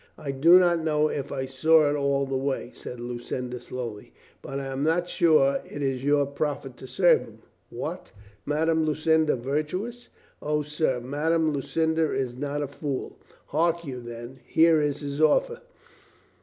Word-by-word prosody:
"I 140 - -4
do 160 +7 +6
not 175 -2 +4
know 155 -1 +2
if 140 -1 -4
I 130 - -2
saw 150 +4 +4
it 145 - +1
all 140 -1 +1
the 135 0 -3
way," 130 -2 -2
said 125 - -8
Lu 120 0 -5
cinda 125 0 -5
slowly. 120 -5 -7 0.3
"But 135 0 -5
I 135 - -5
am 135 0 -4
not 165 +4 +1
sure 155 -6 +3
it 145 - -6
is 135 -2 -1
your 145 0 +3
profit 140 -2 -3
to 130 - -10
serve - - +4
him." - - -14 0.3
"What! - - -6 0.3
Madame 160 +2 +1
Lucinda 155 0 +2
virtuous?" 155 - -3 0.3
"O, 150 0 0
sir, 150 -3 -1
Madame 155 +5 0
Lucinda 160 +3 0
is 125 -2 -2
not 145 +2 -3
a - - -3
fool. 140 -1 -5 0.3
Hark 170 +2 +1
you, 130 -3 -6
then, 120 +2 -9
here 160 +2 +4
is 145 -1 -1
his 145 +1 -4
offer. 485 - +3
145 Hz, 170 wpm, -26 LUFS, 135-160 Hz, 0.3 s, do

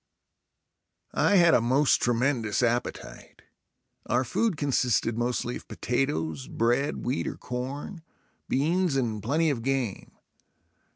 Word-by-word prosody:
I - - +3
had 170 -3 +6
a - - +5
most 130 +5 +3
tremendous 120 -2 +1
appetite. 120 +1 -3 0.6
Our 125 +2 +2
food 190 - 0
consisted 125 -5 +1
mostly 120 +1 -1
of - - -15
potatoes, 80 - -2
bread, 120 +5 0
wheat 125 +3 -1
or - - -4
corn, 135 +8 -5 0.5
beans 165 +4 +1
and 115 -5 -1
plenty 155 +8 +1
of 125 -5 -3
game. 130 -5 -2
125 Hz, 115 wpm, -27 LUFS, 120-145 Hz, 0.6 s, had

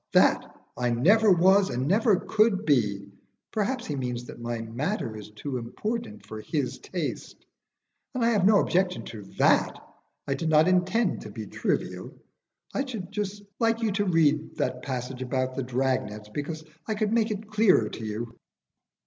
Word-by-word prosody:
That - - +3 0.2
I 125 -1 0
never 200 - +5
was 190 +3 +5
and 125 +2 -1
never 210 +4 +4
could 215 +1 +2
be. 105 -9 +1 0.4
Perhaps 235 +4 -1
he 150 - -3
means 125 -2 -3
that 120 - -10
my 120 0 -3
matter 115 - -3
is 105 -1 -9
too 130 +5 -5
important 120 - -5
for 110 +1 -7
his 140 +1 -2
taste; 175 -5 -5 0.7
and 245 -2 +1
I 235 - +4
have 205 -5 +2
no 205 +1 +6
objection 180 0 +1
to 110 - -8 0.2
that. - - +3 0.5
I 140 - +1
did 160 +4 -2
not 155 +1 +5
intend 185 +6 +2
to - - -8
be - - -7
trivial. - - -3 0.6
I 275 - 0
should 220 -9 -6
just 205 -1 -4 0.2
like 230 0 +3
to 210 -3 0
read 160 -5 +4
you 155 - -12
that 125 - -2
passage 130 -1 -4
about 130 0 -1
the 135 - -3
drag 130 -2 0
nets, 105 0 -10
because 155 +6 -5 0.2
I 220 - -1
could 215 0 0
make 225 -1 +2
it 215 0 -5
clearer 210 - +4
to 115 - -8
you." 110 +2 -5
155 Hz, 175 wpm, -27 LUFS, -, 0.7 s, no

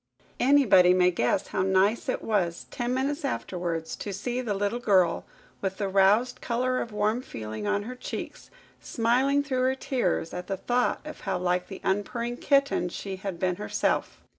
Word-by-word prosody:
Anybody 210 -10 +6
may 180 0 +4
guess 170 +4 0
how - - -1
nice 190 +4 +2
it - - -2
was, 180 -6 -1
ten 240 0 -2
minutes 280 +4 -1
afterwards, 175 - -3
to 205 - -5
see 240 +6 -3
the 215 -5 -2
little 205 +4 -1
girl, 190 -7 +2 0.4
with 190 -1 -2
the 200 - -1
roused 205 +6 +3
colour 255 +2 0
of 230 - -5
warm 210 +3 0
feeling 110 - -6
on 205 0 0
her 245 +4 -6
cheeks, 250 - -7 0.3
smiling 260 +5 +2
through 260 -3 -1
her 260 +1 +2
tears 235 -11 -1
at 180 0 -5
the 195 - -2
thought 245 +5 0
of 305 - -8
how 195 -2 -2
like 180 0 0
the 195 - -9
unpurring 235 +5 -1
kitten 275 -11 +2
she 190 +2 -6
had 190 -2 -5
been 180 -1 0
herself! 105 - -1
205 Hz, 175 wpm, -27 LUFS, 185-250 Hz, 0.4 s, Anybody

